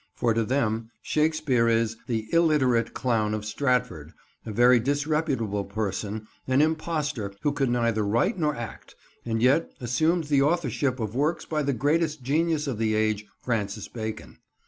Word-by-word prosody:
For 115 -2 +1
to 115 +1 +1
them 115 -2 -1
Shakespeare 150 -6 +1
is 115 -1 +2
"the 110 -3 -1
illiterate 135 -9 +3
clown 110 -4 0
of 105 -1 -5
Stratford"; 125 - -1 0.3
a - - -3
very 120 +3 +5
disreputable 140 -6 0
person; 105 +1 -3 0.2
an 130 +1 +3
impostor 150 -8 -1
who 145 - +2
could 135 -2 0
neither 115 -2 +1
write 115 - +1
nor 150 -2 +1
act, 115 -1 -8 0.3
and 115 -1 -1
yet 140 +6 +3
assumed 155 +8 +1
the 145 -2 +2
authorship 140 -4 0
of 110 -2 -3
works 150 +6 0
by 155 -1 -1
the 140 -1 0
greatest 150 +2 0
genius 155 +3 +1
of 130 -6 -3
the 110 -1 +1
age, 110 -1 0 0.2
Francis 105 -4 -2
Bacon. 110 -2 -7
125 Hz, 155 wpm, -26 LUFS, 110-150 Hz, 0.3 s, very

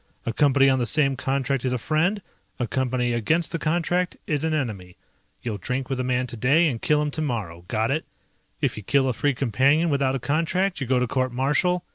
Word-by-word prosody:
A 115 - -2
Company 140 +1 +4
on 130 -1 +3
the 120 - 0
same 140 0 +2
contract 135 0 -1
is 130 - 0
a - - 0
friend, 165 - 0 0.3
a 120 - -1
Company 125 -1 -1
against 155 +9 +1
the 165 - -2
contract 175 +3 0
is 150 -2 -1
an 160 - 0
enemy. 105 - -3 0.5
You'll 110 -4 -3
drink 130 +7 -3
with 130 - -1
a - - 0
man 125 0 0
today, 135 +8 +2
and 115 -5 -4
kill 150 0 +2
him 150 - -2
tomorrow. 110 - -4
Got 110 +5 0
it? 155 +3 -1 0.6
If - - 0
you - - -5
kill 135 +6 +2
a 130 - +1
Free 140 +3 0
Companion 140 +7 +2
without 135 -2 +1
a - - -2
contract 170 +6 0
you 130 - -2
go 130 0 +2
to 125 - +2
court 130 +1 -1
martial. 150 +8 +1
135 Hz, 215 wpm, -24 LUFS, 125-155 Hz, 0.6 s, Company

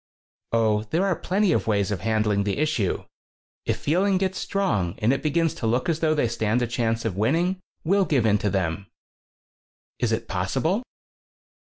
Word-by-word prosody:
"Oh, 110 -2 +2
there 175 +5 +1
are 190 -3 +1
plenty 195 +1 +1
of 110 -2 0
ways 100 -2 +1
of 100 - -1
handling 110 -1 +1
the 100 -1 -1
issue. 150 -9 0 0.6
If - - +1
feeling 190 +5 +2
gets 190 0 -1
strong 105 - -1
and 115 +5 +2
it 135 - -2
begins 160 +1 +1
to 115 - -3
look 120 +3 +1
as 160 -1 0
though 155 -1 +2
they 145 -5 +2
stand 115 +1 0
a - - +2
chance 115 -1 -1
of 100 -4 -2
winning, 165 - +1 0.2
we'll 195 +3 +3
give 140 -8 +1
in 105 -1 +3
to 105 - 0
them." 95 0 -2 1.1
"Is 120 - +1
it 115 +1 -1
possible?" 100 - 0
120 Hz, 180 wpm, -24 LUFS, 105-165 Hz, 1.1 s, we'll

